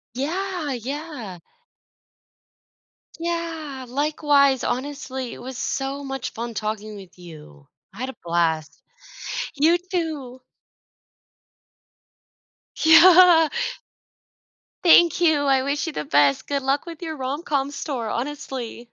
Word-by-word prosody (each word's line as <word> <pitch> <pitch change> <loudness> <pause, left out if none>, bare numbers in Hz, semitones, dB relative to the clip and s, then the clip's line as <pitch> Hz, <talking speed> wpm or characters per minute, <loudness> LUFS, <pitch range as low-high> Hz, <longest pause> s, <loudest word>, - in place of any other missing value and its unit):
Yeah, 335 +1 -2
yeah. 250 - -6 1.8
Yeah, 330 -5 -4
likewise, 280 0 +2
honestly, 265 -2 -4
it - - -11
was 260 +1 -7
so 275 +1 -3
much 270 -2 -5
fun 235 0 -6
talking 215 0 -4
with 190 -2 -13
you. 150 - -13 0.3
I 215 - -13
had 260 +1 -3
a - - -9
blast. 165 -2 -1 0.7
You 325 +5 +3
too. 315 -9 -4 2.4
Yeah. 330 0 +8 1.3
Thank 345 -1 +6
you, 310 -4 +3
I 265 -1 +3
wish 285 +4 -1
you 315 - -4
the - - -3
best. 140 -1 +2
Good 280 -1 -2
luck 275 +4 0
with 335 0 -9
your 320 -2 -5
rom-com 280 +1 -2
store, 265 -6 -4
honestly. 255 -2 -5
275 Hz, 110 wpm, -23 LUFS, 240-315 Hz, 2.4 s, Yeah